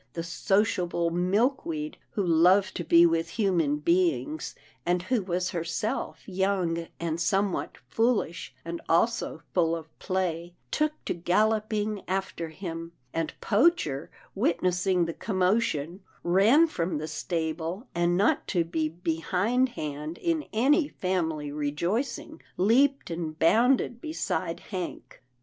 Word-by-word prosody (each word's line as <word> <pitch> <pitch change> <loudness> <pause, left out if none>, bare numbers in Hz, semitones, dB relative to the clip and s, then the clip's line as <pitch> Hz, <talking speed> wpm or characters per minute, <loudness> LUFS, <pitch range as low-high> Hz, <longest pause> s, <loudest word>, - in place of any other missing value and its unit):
The 165 - -3
sociable 175 -1 +1
Milkweed, 265 - 0 0.2
who 200 -4 0
loved 180 +4 +4
to 175 - -3
be 170 +1 +6
with 165 0 +1
human 175 -9 +1
beings, 155 -3 0 0.3
and 175 +1 +1
who 240 +3 +1
was 185 0 -1
herself 170 +5 -3
young 185 -4 0
and 170 0 -2
somewhat 195 +3 0
foolish, 225 - 0
and 170 0 -5
also 170 -2 +1
full 165 -2 +2
of 160 -1 -10
play, 175 -2 -2 0.2
took 305 0 +1
to - - 0
galloping 210 +3 +1
after 190 -3 -2
him, 165 -1 -6 0.2
and 165 -1 -1
Poacher, 205 - +2 0.2
witnessing 180 +1 +1
the 165 - -3
commotion, 185 -4 0 0.2
ran 205 - +5
from 170 - -2
the 155 +1 -4
stable, 165 - -3
and, 175 0 +2
not 290 +11 +2
to 175 -3 +1
be 160 -2 -1
behindhand 170 - -1
in 330 -3 -1
any 285 +8 +3
family 160 - -2
rejoicing, 170 - -2 0.2
leaped 255 +5 +3
and 165 -2 -4
bounded 235 +7 +3
beside 315 +1 -3
Hank. 180 -8 -6
180 Hz, 120 wpm, -27 LUFS, 165-215 Hz, 0.3 s, be